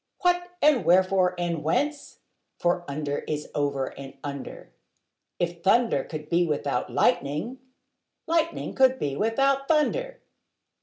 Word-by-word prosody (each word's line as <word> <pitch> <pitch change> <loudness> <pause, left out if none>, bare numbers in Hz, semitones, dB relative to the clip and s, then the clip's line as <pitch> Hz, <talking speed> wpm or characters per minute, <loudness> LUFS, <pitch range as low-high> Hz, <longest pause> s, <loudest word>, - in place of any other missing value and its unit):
What, 355 -1 +1
and 295 -5 +5
wherefore, 185 +1 +3
and 170 -3 -2
whence? 285 - -1 0.4
for 175 0 0
under 145 0 -3
is 150 -1 -3
over 140 -2 0
and 135 0 -10
under: 140 -2 -7 0.7
If 170 0 -2
thunder 210 - +3
could 150 -1 -7
be 170 +2 +2
without 150 -2 -1
lightning, 155 - 0 0.7
lightning 330 0 0
could 260 -1 +4
be 140 - -2
without 270 - +1
thunder. - - +1
180 Hz, 120 wpm, -26 LUFS, -, 0.7 s, and